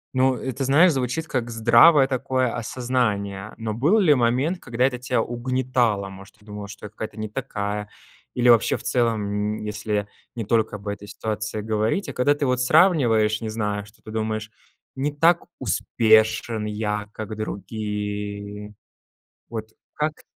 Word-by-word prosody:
Ну, 130 0 +3
это, 130 +1 -4
знаешь, 150 +7 +5
звучит 135 +3 -2
как 125 -6 -2
здравое 120 +6 +6
такое 130 -2 0
осознание. 110 -5 -2
Но 115 -1 -3
был 145 - +3
ли 170 -7 +5
момент, 130 +8 +1
когда 120 -3 -2
это 125 -2 -1
тя 125 -2 0
угнетало? 120 -4 0
Может, 95 +3 -13
ты 105 -1 -24
думала, 105 -1 -7
что 105 +1 -10
это 105 - -10
какая-то 110 -1 -6
не 110 0 -4
такая? 105 -4 -4 0.5
Или 125 0 +3
вообще 115 -1 +5
в - - -13
целом, 115 -3 +1 0.4
м, - - -7
если 105 -1 -2 0.3
не 115 -3 -4
только 110 0 +1
об 105 0 -10
этой 100 0 -5
ситуации 110 0 -4
говорить, 110 - -1
а - - -5
когда 135 +4 +2
ты 145 - -1
вот 125 -1 +1
сравниваешь, 125 - +4
не 110 - -3
знаю, 105 -2 -2
что 100 - -21
ты 110 - -9
думаешь: 110 0 -3 0.4
"Не 140 +2 -1
так 165 +4 +3
успешен 110 0 +2
я, 105 -1 -3
как 110 0 -6
другие". 105 0 -5 0.7
Вот 110 -1 -5 0.3
как 150 0 -1
т - - -20
110 Hz, 160 wpm, -23 LUFS, 105-130 Hz, 0.7 s, здравое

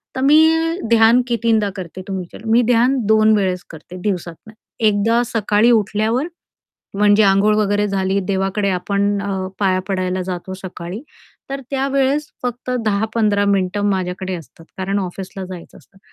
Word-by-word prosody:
तर 260 - -2
मी 320 +4 +4
ध्यान 230 +2 +5
कितीदा 230 -3 +1
करते 185 -1 -7
तुमच्या 185 -3 -6
मी 225 +2 +4
ध्यान 245 +3 +3
2 220 0 +5
वेळेस 185 -3 -1
करते 165 +3 -11
दिवसातून, 180 +1 -4 0.3
एकदा 220 +2 +2
सकाळी 215 +1 +3
उठल्यावर 220 - +1 0.7
म्हणजे 205 +1 +4
अंघोळ 195 +2 +4
वगैरे 205 0 +1
झाली 195 0 0
देवाकडे 195 +1 -1
आपण 200 +2 0
अ, 190 -2 -3
पाया 185 -2 +1
पडायला 185 -1 -1
जातो 180 0 -5
सकाळी. 185 +4 -7 0.5
तर 275 0 -3
त्यावेळेस 275 +2 0 0.2
फक्त 245 +1 -4
10-15 210 0 +1
मिनिटं 200 0 0
माझ्याकडे 185 0 -2
असतात, 165 0 -11
कारण 195 +2 -1
ऑफिसला 190 +1 -6
जायचं 180 -2 -10
असतं. 195 - -23
205 Hz, 140 wpm, -19 LUFS, 190-225 Hz, 0.7 s, ध्यान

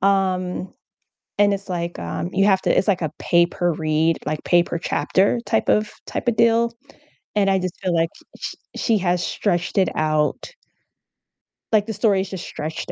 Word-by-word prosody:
um, 185 -1 0 0.7
and 205 0 +4
it's, 195 0 -6
like, 170 -1 -3
um 85 0 -4
you 195 - +3
have 190 -2 +4
to - - +2
It's 185 - +2
like 185 -5 +2
a 155 - -2
pay 170 0 +4
per 175 0 -1
read, 155 +1 +1
like, 155 0 -3
pay 175 -1 +5
per 170 - -4
chapter 195 +6 +1
type - - 0
of 210 0 +2 0.2
typa 240 - -1
deal, 230 +1 +3 0.6
and 200 -2 +3
I 195 - +3
just 185 -1 -4
feel 180 -3 0
like 165 0 +2 0.3
sh - - -4 0.2
she 225 -3 +1
has 180 -1 0
stretched 175 +3 0
it 190 - +3
out 155 - 0 1.2
like, 215 -2 +3
the 220 - -4
story 200 -3 +2
is 190 - -5
just 190 -2 -6
stretched 155 +1 -5
185 Hz, 180 wpm, -22 LUFS, 170-200 Hz, 1.2 s, pay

